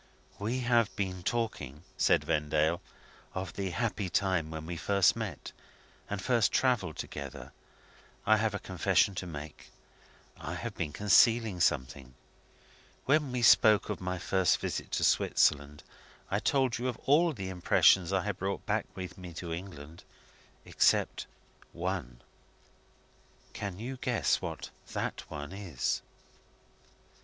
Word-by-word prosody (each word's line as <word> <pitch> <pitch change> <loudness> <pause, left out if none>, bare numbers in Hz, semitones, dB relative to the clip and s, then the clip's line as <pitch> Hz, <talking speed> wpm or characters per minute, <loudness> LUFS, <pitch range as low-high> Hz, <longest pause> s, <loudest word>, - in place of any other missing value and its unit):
"We 115 +5 -1
have 120 -3 +3
been 95 -2 -3
talking," 85 - -3
said - - +3
Vendale, 75 +1 +1 0.5
"of 95 -2 -4
the 95 -1 -3
happy 105 -2 -2
time 95 -3 +1
when 80 0 -6
we 85 +1 -5
first 100 +2 +3
met, - - -5 0.6
and 105 - -3
first 115 +2 +2
travelled 110 -11 +1
together. 70 -2 -7 0.7
I 110 +1 +5
have 110 -1 0
a - - 0
confession 95 +1 +1
to 90 -1 -5
make. 75 -2 -9 0.7
I - - -5
have - - -5
been 75 -3 -3
concealing 105 +1 +4
something. 65 -4 0 0.9
When 145 -1 +2
we 125 -1 -2
spoke 110 -2 +6
of 100 - -5
my 90 0 -2
first 95 0 +2
visit - - -4
to - - 0
Switzerland, 75 0 +2 0.5
I 100 - +2
told 130 0 +1
you 125 - -2
of 125 - -2
all 165 +5 +4
the 95 -9 -5
impressions 90 0 +4
I 95 -2 +1
had 105 -2 -3
brought 95 +1 -3
back - - 0
with 95 0 -7
me 90 -2 -9
to 85 -1 -5
England 85 -3 -8 0.6
except - - +2 0.5
one. 85 -9 -4 1.3
Can 100 -3 -5
you 125 +5 -5
guess 125 -2 +1
what - - -6 0.2
that - - -4
one 75 +1 -6
is?" 90 -10 -2
95 Hz, 135 wpm, -30 LUFS, 80-110 Hz, 1.3 s, spoke